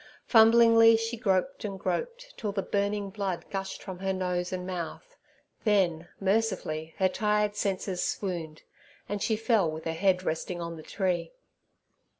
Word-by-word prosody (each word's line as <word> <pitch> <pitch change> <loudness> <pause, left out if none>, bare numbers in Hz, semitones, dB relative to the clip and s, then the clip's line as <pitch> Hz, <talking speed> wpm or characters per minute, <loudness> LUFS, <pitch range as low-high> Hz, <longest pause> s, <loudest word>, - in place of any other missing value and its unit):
Fumblingly 230 0 +7
she 225 +1 -2
groped 225 +4 0
and 195 -2 -4
groped, 480 - -3
till 210 -3 -3
the 195 -1 -2
burning 200 0 -1
blood 195 -4 -3
gushed 195 -1 -4
from 185 -2 -7
her 190 0 -1
nose 180 -1 -2
and 180 -1 -3
mouth; 185 - -6 0.5
then, 180 -6 +2
mercifully, 190 -6 -1
her 190 - +3
tired 210 +2 0
senses 190 -3 -1
swooned, 170 -6 -3 0.4
and 205 0 -3
she 220 - +1
fell 220 -5 +2
with 155 0 -6
her 165 - 0
head 185 +2 +2
resting 175 +1 -3
on 170 0 -5
the 160 - -9
tree. 185 - -2
195 Hz, 155 wpm, -28 LUFS, 180-215 Hz, 0.5 s, Fumblingly